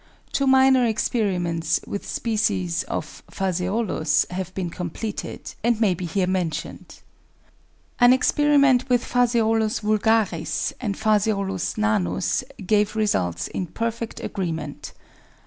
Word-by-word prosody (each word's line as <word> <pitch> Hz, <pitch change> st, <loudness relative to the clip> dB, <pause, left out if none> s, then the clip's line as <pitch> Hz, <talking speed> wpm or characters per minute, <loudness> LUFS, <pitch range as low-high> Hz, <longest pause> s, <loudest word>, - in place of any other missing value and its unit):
Two 275 Hz, -, 0 dB
minor 265 Hz, -1 st, +5 dB
experiments 180 Hz, -8 st, 0 dB
with 200 Hz, -, -5 dB
species 205 Hz, -6 st, 0 dB
of -, -, -5 dB
Phaseolus 185 Hz, -3 st, 0 dB
have 185 Hz, 0 st, -4 dB
been 180 Hz, -3 st, -3 dB
completed, 180 Hz, +5 st, -5 dB
and 235 Hz, -1 st, +2 dB
may 210 Hz, -5 st, +3 dB
be 175 Hz, 0 st, -5 dB
here 185 Hz, +3 st, 0 dB
mentioned. 180 Hz, -4 st, -4 dB, 1.0 s
An 245 Hz, 0 st, +7 dB
experiment 280 Hz, -1 st, +3 dB
with 245 Hz, -1 st, +2 dB
Phaseolus 225 Hz, -3 st, +1 dB
vulgaris 215 Hz, -5 st, +1 dB
and 205 Hz, -6 st, -2 dB
Phaseolus 200 Hz, -4 st, 0 dB
nanus 215 Hz, -1 st, 0 dB, 0.2 s
gave 210 Hz, +2 st, +2 dB
results 90 Hz, -, 0 dB
in 180 Hz, -, -4 dB
perfect 230 Hz, +3 st, -4 dB
agreement. 160 Hz, -6 st, -4 dB
210 Hz, 110 wpm, -23 LUFS, 180-230 Hz, 1.0 s, An